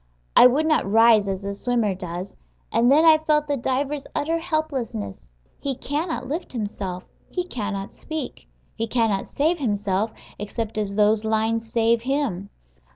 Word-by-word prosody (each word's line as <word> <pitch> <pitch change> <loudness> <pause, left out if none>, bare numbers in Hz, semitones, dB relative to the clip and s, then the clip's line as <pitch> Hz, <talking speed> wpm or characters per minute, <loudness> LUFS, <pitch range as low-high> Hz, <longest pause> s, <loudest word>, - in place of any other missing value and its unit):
I - - +10
would 285 +5 +1
not 310 -10 +2
rise 225 -2 +6
as 195 0 -3
a 200 - -2
swimmer 225 -1 0
does. 180 0 -6 0.4
And 240 +2 +4
then 310 +4 +6
I 315 -1 +7
felt 300 -1 +1
the 290 - +1
diver's 275 +2 -2
utter 330 +3 0
helplessness: 265 - -3 0.3
he 275 -2 -2
cannot 290 -1 -3
lift 310 +3 -4
himself; 200 -5 -4 0.3
he 360 - -2
cannot 205 - -4
speak; 315 -1 -6 0.3
he 225 0 -3
cannot 225 -4 +1
save 320 +4 +1
himself, 205 -3 0 0.3
except 215 +1 -3
as 200 -2 -2
those 210 +1 +3
lines 225 +1 0
save 230 0 +3
him. 245 -8 -1
230 Hz, 155 wpm, -23 LUFS, 205-290 Hz, 0.4 s, I